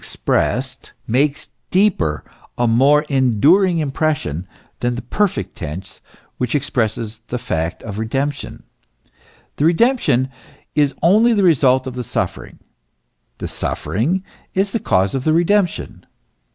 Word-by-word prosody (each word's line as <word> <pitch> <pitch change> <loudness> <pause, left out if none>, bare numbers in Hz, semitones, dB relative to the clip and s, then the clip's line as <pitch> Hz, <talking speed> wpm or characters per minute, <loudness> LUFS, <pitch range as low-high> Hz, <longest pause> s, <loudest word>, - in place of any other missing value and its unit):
61 - - 0 0.4
makes 140 +5 +1
a - - -24 0.2
deeper, 180 - +1 0.3
a 120 - +2
more 135 +6 +4
enduring 150 - +3
impression, 140 - -1 0.3
than 120 0 0
the 120 - -6
perfect 205 -2 -1
tense 85 +4 -7 0.4
which 125 +2 -1
expresses 115 -5 -2
the 125 - -3
fact 85 -9 -3
of 105 -1 -6
redemption. 135 +6 -3 0.9
The 145 - +1
redemption 165 - +3 0.4
is 145 -2 +2
only 215 +7 +5
the 205 -3 +2
result 130 -6 +4
of 130 - -5
the 125 0 -4
suffering; - - -4 0.8
the - - -5
suffering 165 - -1 0.3
is 195 +1 +1
the 230 - -1
cause 95 - +1
of 135 - -2
the 155 - +2
redemption. 175 +2 0
135 Hz, 125 wpm, -19 LUFS, 115-170 Hz, 0.9 s, only